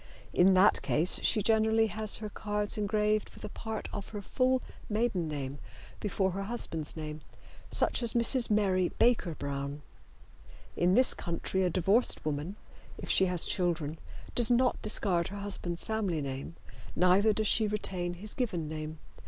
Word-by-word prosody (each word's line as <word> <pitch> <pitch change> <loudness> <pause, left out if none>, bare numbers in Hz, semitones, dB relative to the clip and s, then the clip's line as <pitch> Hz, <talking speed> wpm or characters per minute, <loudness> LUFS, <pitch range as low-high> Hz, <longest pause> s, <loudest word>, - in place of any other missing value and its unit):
In 185 +1 +5
that 190 +3 +5
case 165 +4 +2
she 215 -3 +2
generally 220 +1 +3
has 215 0 -1
her 215 0 -6
cards 210 0 -1
engraved 210 0 0
with - - -13
a - - -6
part 220 +1 -6
of 200 -2 -6
her 205 -2 -6
full 255 +4 +1 0.3
maiden 210 -6 0
name 140 -2 -5 0.4
before 190 -2 -1
her 195 +2 -4
husband's 165 -9 -4
name, 155 -1 -6 0.5
such - - +1
as 235 -1 +2
Mrs. 235 +1 +3
Mary 190 -4 +2
Baker 230 -9 +2
Brown. 140 +1 -5 0.9
In 180 +2 +2
this 255 +2 +6
country 175 +2 -2
a 180 - +2
divorced 195 +7 +2
woman, 155 +5 -3 0.4
if - - -3
she 190 - +4
has 180 -2 +1
children, 165 -4 -1 0.3
does 240 -2 +3
not 245 +1 +2
discard 185 -5 +3
her 200 - -7
husband's 175 -4 -3
family 205 -7 -1
name, 140 +3 -5 0.4
neither 185 +4 +4
does 215 +1 -1
she 220 +1 +3
retain 185 -4 -2
his 210 +4 -3
given 180 - -2
name. 155 0 -6
195 Hz, 160 wpm, -30 LUFS, 170-215 Hz, 0.9 s, this